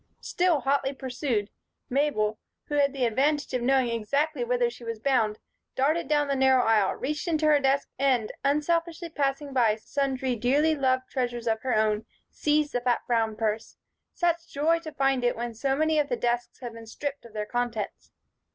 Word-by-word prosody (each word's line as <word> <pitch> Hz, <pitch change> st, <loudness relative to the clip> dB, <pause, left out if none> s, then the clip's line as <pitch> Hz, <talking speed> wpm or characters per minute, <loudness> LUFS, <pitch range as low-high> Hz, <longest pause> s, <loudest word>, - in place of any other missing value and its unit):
Still 350 Hz, -5 st, +1 dB
hotly 275 Hz, +1 st, +1 dB
pursued, 250 Hz, -5 st, -2 dB, 0.4 s
Mabel, 245 Hz, -6 st, 0 dB, 0.3 s
who -, -, -4 dB
had 285 Hz, -1 st, +3 dB
the 265 Hz, -2 st, 0 dB
advantage 280 Hz, +5 st, +1 dB
of 250 Hz, -, 0 dB
knowing 260 Hz, 0 st, +2 dB
exactly 275 Hz, +5 st, 0 dB
whither 245 Hz, 0 st, +1 dB
she 240 Hz, 0 st, -9 dB
was 230 Hz, -1 st, -4 dB
bound, 225 Hz, -4 st, +1 dB, 0.4 s
darted 300 Hz, +4 st, +1 dB
down 295 Hz, 0 st, +2 dB
the 280 Hz, -, 0 dB
narrow 265 Hz, -1 st, +4 dB
aisle, 215 Hz, -3 st, +3 dB
reached 300 Hz, +5 st, -3 dB
into 315 Hz, -2 st, +1 dB
her 300 Hz, -1 st, +5 dB
desk, 275 Hz, 0 st, +1 dB
and, 255 Hz, -5 st, +2 dB
unselfishly 335 Hz, +4 st, 0 dB
passing 280 Hz, -2 st, -2 dB
by 230 Hz, -5 st, +3 dB
sundry 265 Hz, +2 st, -2 dB
dearly 280 Hz, +7 st, +2 dB
loved 260 Hz, -3 st, +1 dB
treasures 240 Hz, -3 st, -2 dB
of 220 Hz, -1 st, 0 dB
her 255 Hz, +1 st, 0 dB
own, 215 Hz, 0 st, +1 dB, 0.2 s
seized 300 Hz, 0 st, +1 dB
the 245 Hz, -, 0 dB
fat 245 Hz, -1 st, +1 dB
brown 225 Hz, -2 st, +1 dB
purse. 220 Hz, 0 st, -2 dB, 0.4 s
Such 340 Hz, -1 st, 0 dB
joy 320 Hz, +4 st, +2 dB
to 320 Hz, -2 st, -8 dB
find 270 Hz, -3 st, +1 dB
it 245 Hz, -, +2 dB
when 235 Hz, 0 st, -4 dB
so 270 Hz, +4 st, 0 dB
many 315 Hz, +1 st, +2 dB
of 290 Hz, -1 st, 0 dB
the 245 Hz, -, 0 dB
desks 240 Hz, +1 st, -2 dB
had 240 Hz, -2 st, -6 dB
been 230 Hz, 0 st, -11 dB
stripped 285 Hz, +4 st, -5 dB
of 235 Hz, -2 st, -14 dB
their 210 Hz, -1 st, -3 dB
contents! 235 Hz, -2 st, -3 dB
265 Hz, 185 wpm, -27 LUFS, 235-290 Hz, 0.4 s, her